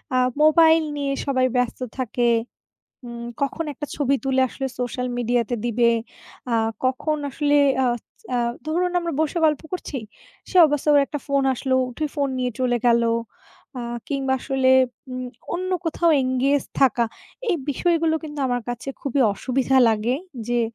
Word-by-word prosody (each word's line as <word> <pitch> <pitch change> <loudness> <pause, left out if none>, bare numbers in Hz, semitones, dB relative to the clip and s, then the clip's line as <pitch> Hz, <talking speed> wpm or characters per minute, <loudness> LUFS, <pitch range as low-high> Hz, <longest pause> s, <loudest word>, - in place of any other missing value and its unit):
আ - - +4 0.2
mobile 320 +1 +6
নিয়ে 280 -1 -1
সবাই 260 -2 +2
ব্যস্ত 250 -2 0 0.2
থাকে। 240 -1 +1 0.8
উম 235 0 -7 0.2
কখন 280 +4 -1
একটা 295 +2 -6
ছবি 275 -1 +2
তুলে 265 -1 +2
আসলে 270 +2 -4
সোশ্যাল 250 0 -2
মিডিয়াতে 240 0 0
দিবে, 235 0 +3 0.6
আ - - +3 0.3
কখন 265 +4 0
আসলে 290 +1 +1 0.3
আচ 240 -2 -1 0.3
আ - - +1 0.3
ধরুন, 350 +3 0
আমরা 340 -1 -3
বসে 315 +2 0
গল্প 300 -2 +1
করছি, 335 -6 -4 0.5
সেই 370 - +5
অবস্থায় 295 0 +1
ওর 285 - +7
একটা 295 - -4
ফোন 280 -1 +1
আসলো, 260 +1 -1 0.2
উঠে 305 +5 -3
ফোন 285 -2 0
নিয়ে 250 -1 0
চলে 245 -1 +2
গেলো। 235 -1 +4 0.7
আ - - -3 0.3
কিংবা 270 -2 -1
আসলে 265 0 +1 0.4
উম 255 0 -4 0.3
অন্য 370 +2 -3
কোথাও 335 +1 +2
engage 260 +2 +1
থাকা। 250 -3 +4 0.5
এই 355 - +2
বিষয়গুলো 330 +1 +1
কিন্তু 300 -2 -7
আমার 245 -1 -1
কাছে 245 +2 -5
খুবই 275 0 -1
অসুবিধা 265 +5 0
লাগে 225 +3 +1 0.3
যে, 240 0 +2
270 Hz, 155 wpm, -23 LUFS, 245-300 Hz, 0.8 s, ওর